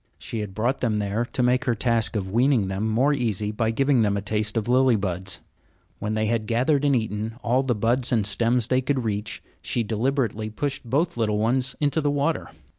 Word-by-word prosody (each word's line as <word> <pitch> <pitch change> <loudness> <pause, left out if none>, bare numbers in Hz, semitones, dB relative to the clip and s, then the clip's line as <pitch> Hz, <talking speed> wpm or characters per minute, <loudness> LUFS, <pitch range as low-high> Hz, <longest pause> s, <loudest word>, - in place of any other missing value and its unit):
She 115 - -5
had 100 -3 -5
brought 120 +5 0
them 110 -4 0
there 105 +3 -1
to 125 - -2
make 125 +1 +2
her 120 - +1
task 115 0 +1
of 95 -3 -2
weaning 120 -3 +2
them 100 +3 -1
more 130 +7 +3
easy 110 -6 -1
by 110 +1 0
giving 135 +2 +2
them 100 -2 +1
a - - -2
taste 105 +1 -1
of 110 - -1
lily 130 0 +4
buds. 95 -3 -3 0.6
When 105 +1 -2
they 110 0 +1
had 110 -1 -1
gathered 130 +6 +2
and 140 -1 +3
eaten 110 -1 -2
all 125 +2 +2
the 130 -3 0
buds 120 +4 0
and 110 -5 +2
stems 115 +3 +1
that 125 - -2
they 130 - +3
could 130 -1 -1
reach, 105 -1 -3 0.2
she 120 - -1
deliberately 115 -1 -1
pushed 135 +6 -3
both 160 +6 0
little 105 -2 +1
ones 125 +4 0
into 150 +2 +1
the 145 - +1
water. 145 +3 -1
115 Hz, 215 wpm, -24 LUFS, 105-130 Hz, 0.6 s, lily